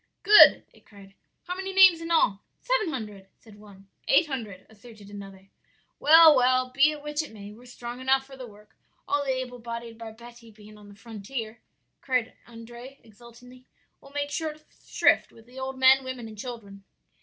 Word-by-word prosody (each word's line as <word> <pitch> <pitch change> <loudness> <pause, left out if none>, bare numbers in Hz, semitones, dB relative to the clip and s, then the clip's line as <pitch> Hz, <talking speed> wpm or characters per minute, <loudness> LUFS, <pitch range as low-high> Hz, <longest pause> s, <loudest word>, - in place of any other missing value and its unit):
"'Good!' 425 +1 +7
they - - -21
cried, 200 -2 -18 0.3
'how 360 - -6
many 385 +1 -6
names 380 -3 +6
in 330 - -7
all?' 210 -12 +1 0.2
"'Seven - - -1
hundred,' 210 -8 -8
said 210 -2 -19
one. 200 -2 -17 0.2
"'Eight 325 +5 +4
hundred,' 225 -10 -7
asserted 215 -1 -16
another. 195 -1 -12 0.5
"'Well, 320 0 +7
well, 255 0 +1
be 280 +4 +3
it 300 -1 -7
which 295 +1 -3
it 310 - -10
may, 205 -2 -11
we're 240 +4 -16
strong 240 0 -9
enough 265 +1 +1
for 270 0 -14
the 255 -2 -10
work, 210 -1 -19 0.3
all 290 0 -1
the 275 - -5
able 255 -1 -4
bodied 230 -1 -8
barbetti 230 +1 -13
being 215 0 -17
on 205 -1 -16
the 200 - -15
frontier,' 220 +2 -8 0.4
cried 255 -4 -2
Andrea, 240 +3 -12
exultingly, 240 +3 -18 0.3
'we'll 275 - -16
make 290 0 -4
short 310 -1 -5 0.2
shrift - - +1
with 225 - -19
the 250 +2 -13
old 265 0 -6
men, 265 +1 +5
women 255 -3 -7
and 220 - -12
children.' 205 -4 -10
240 Hz, 180 wpm, -25 LUFS, 215-270 Hz, 0.5 s, Good